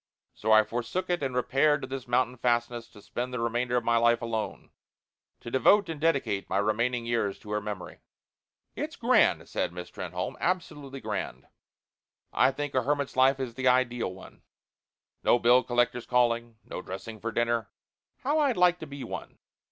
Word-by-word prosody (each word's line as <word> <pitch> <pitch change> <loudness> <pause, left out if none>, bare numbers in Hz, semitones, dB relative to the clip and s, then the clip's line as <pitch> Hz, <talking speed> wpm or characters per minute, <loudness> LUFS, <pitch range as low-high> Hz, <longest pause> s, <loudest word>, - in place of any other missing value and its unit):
So 110 - -1
I 110 0 +8
forsook 120 - -3
it 175 - 0
and 130 -3 -2
repaired 140 +4 +2
to 130 - -5
this 130 -1 -6
mountain 125 +1 +1
fastness 120 -1 0
to 105 -3 -16
spend 125 +1 -4
the 125 - -3
remainder 120 +1 0
of 120 - 0
my 115 0 +3
life 120 0 +4
alone 115 -2 -4 0.7
to 120 - -8
devote 195 +8 +4
and 155 -3 -5
dedicate 140 -11 0
my - - 0
remaining 115 +4 0
years 115 -4 0
to 105 - -11
her 105 0 0
memory." 105 -3 -6 0.8
"It's - - -4
grand," - - +3
said - - -2
Miss 90 0 -8
Trenholme, 90 0 -5
"absolutely 150 -7 -3
grand. - - -4 0.9
I - - +5
think 145 +1 -4
a 130 - +3
hermit's 145 +1 -1
life 130 +1 +4
is 130 -3 -3
the 130 +1 -1
ideal 125 -4 +2
one. 95 +1 -13 0.8
No - - +4
bill 120 +1 +5
collectors 120 0 0
calling, 120 -2 +1
no - - -6
dressing 105 +4 -8
for 115 +2 -3
dinner 120 -3 0 0.5
how 295 +4 +2
I'd 280 -7 +2
like 180 -1 +4
to 160 - -7
be 140 -1 -7
one! - - -7
120 Hz, 175 wpm, -28 LUFS, 115-135 Hz, 0.9 s, I